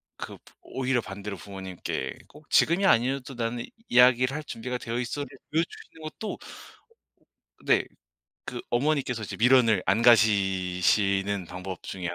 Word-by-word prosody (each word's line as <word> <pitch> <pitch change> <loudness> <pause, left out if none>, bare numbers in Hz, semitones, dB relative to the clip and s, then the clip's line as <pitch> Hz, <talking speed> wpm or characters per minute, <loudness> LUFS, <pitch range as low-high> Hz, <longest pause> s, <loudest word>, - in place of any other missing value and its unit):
그 - - -8 0.2
오히려 130 -1 -1
반대로 100 0 -7
부모님께 95 -2 -5
꼭 150 0 -17
지금이 175 +4 +4
아니어도 135 -2 +2
나는 120 0 -3 0.2
이야기를 125 +2 +5
할 155 - -4
준비가 125 -2 -5
되어있어를 125 +4 -3 0.3
보여주시는 160 0 -3
것도 155 +8 -5 1.3
네. - - +3 0.6
그 120 - -5
어머니께서 125 -2 0
이제 - - -5
미련을 115 -4 +5
안 100 +4 +2
가지시는 100 -3 +3
방법 90 +2 -7
중에 90 -2 -5
120 Hz, 305 characters per minute, -27 LUFS, 100-130 Hz, 1.3 s, 이야기를